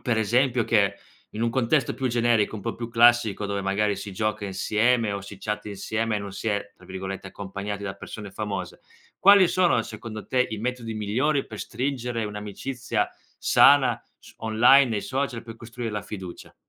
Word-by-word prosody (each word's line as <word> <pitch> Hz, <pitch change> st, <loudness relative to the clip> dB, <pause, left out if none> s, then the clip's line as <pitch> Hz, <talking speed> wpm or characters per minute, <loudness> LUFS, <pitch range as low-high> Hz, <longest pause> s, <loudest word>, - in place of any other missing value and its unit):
per 120 Hz, -2 st, 0 dB
esempio 120 Hz, +2 st, +2 dB
che 100 Hz, -3 st, +2 dB, 0.4 s
in 110 Hz, -, -4 dB
un 115 Hz, -, +1 dB
contesto 125 Hz, +2 st, +1 dB
più 130 Hz, -, -3 dB
generico, 115 Hz, -3 st, +2 dB
un 100 Hz, -, -8 dB
po' -, -, -3 dB
più 115 Hz, 0 st, -6 dB
classico 115 Hz, -3 st, +4 dB
dove 100 Hz, 0 st, -2 dB
magari 100 Hz, +2 st, +1 dB
si 100 Hz, +1 st, -7 dB
gioca 105 Hz, +1 st, -2 dB
insieme 105 Hz, +3 st, +1 dB
o 100 Hz, -, -3 dB
si 100 Hz, 0 st, -10 dB
chatta 105 Hz, +1 st, -4 dB
insieme 110 Hz, +2 st, -2 dB
e -, -, -1 dB
non 100 Hz, -1 st, -7 dB
si 100 Hz, +3 st, -3 dB
è, 100 Hz, -1 st, -2 dB
tra -, -, -19 dB
virgolette, 95 Hz, +1 st, -6 dB
"accompagnati" 100 Hz, +1 st, -6 dB
da 95 Hz, -1 st, -3 dB
persone 105 Hz, 0 st, -9 dB
famose, 100 Hz, -3 st, -5 dB, 0.4 s
quali 200 Hz, -1 st, +7 dB
sono 175 Hz, -11 st, +3 dB
secondo 110 Hz, -1 st, -8 dB
te 125 Hz, -1 st, +2 dB
i 110 Hz, -, -4 dB
metodi 120 Hz, 0 st, -4 dB
migliori 130 Hz, +8 st, 0 dB
per 110 Hz, -2 st, -9 dB
stringere 125 Hz, -2 st, -3 dB
un'amicizia 105 Hz, +5 st, -3 dB, 0.3 s
sana 130 Hz, -5 st, +5 dB, 0.2 s
s -, -, -16 dB
online 115 Hz, +2 st, +5 dB
e -, -, -1 dB
social 130 Hz, -3 st, -2 dB
per 115 Hz, -1 st, -10 dB
costruire 115 Hz, 0 st, -6 dB
la 105 Hz, -, -2 dB
fiducia? 95 Hz, -4 st, -9 dB
110 Hz, 180 wpm, -25 LUFS, 100-120 Hz, 0.4 s, quali